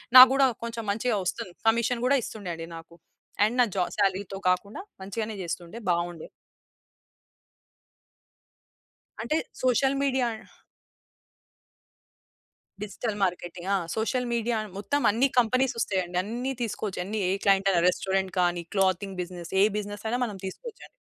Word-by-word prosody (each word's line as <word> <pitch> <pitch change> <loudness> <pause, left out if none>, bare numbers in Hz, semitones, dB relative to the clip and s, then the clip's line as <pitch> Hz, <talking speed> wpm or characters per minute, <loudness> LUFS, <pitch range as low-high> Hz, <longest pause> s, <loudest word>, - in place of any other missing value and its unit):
నాకు 255 0 +13
గూడా 270 0 +5 0.2
కొంచెం 230 -1 -4
మంచిగా 225 +2 0
ఒస్తుంది. 175 0 -3
కమిషన్ 235 +1 +2
గూడా 280 +2 +4
ఇస్తుండే 200 -5 -6
అండి 165 0 -7
నాకు. 165 +1 -13 0.5
అండ్ 220 +4 +2
నా 245 - +7
జా 185 - +2
సాలరీతో 195 0 0
కాకుండా 200 - -1 0.2
మంచిగానే 215 +2 -4
జేస్తుండే. 175 +4 -5
బావుండే. 170 -1 -1 2.9
అంటే 305 - -1 0.3
సోషల్ 260 +2 +3
మీడియా 260 -3 +2 2.6
డిజిటల్ 210 +1 -4
మార్కెటింగ్. 175 0 -3
ఆ! - - +3 0.2
సోషల్ 245 +3 0
మీడియా 230 0 0 0.2
మొత్తం 285 +8 -1
అన్ని 245 +6 +3
కంపెనీస్ 255 +2 +2
ఒస్తాయండి. 180 -4 -1
అన్ని 245 +5 -3
తీసుకోవచ్చు. 210 -4 -3
అన్ని 215 +2 -3
ఏ - - +2
క్లయింట్ 195 0 +4
అయినా 170 -2 +3
రెస్టారెంట్ 190 0 -1
కానీ, 175 -1 +1
క్లాతింగ్ 190 0 +1
బిజినెస్. 175 -1 -7
ఏ - - +7
బిజినెస్ 205 0 -5
అయినా 245 +3 0
మనం 205 -4 -6
తీసుకోవచ్చండి. 455 - -9
205 Hz, 130 wpm, -27 LUFS, 185-240 Hz, 2.9 s, నాకు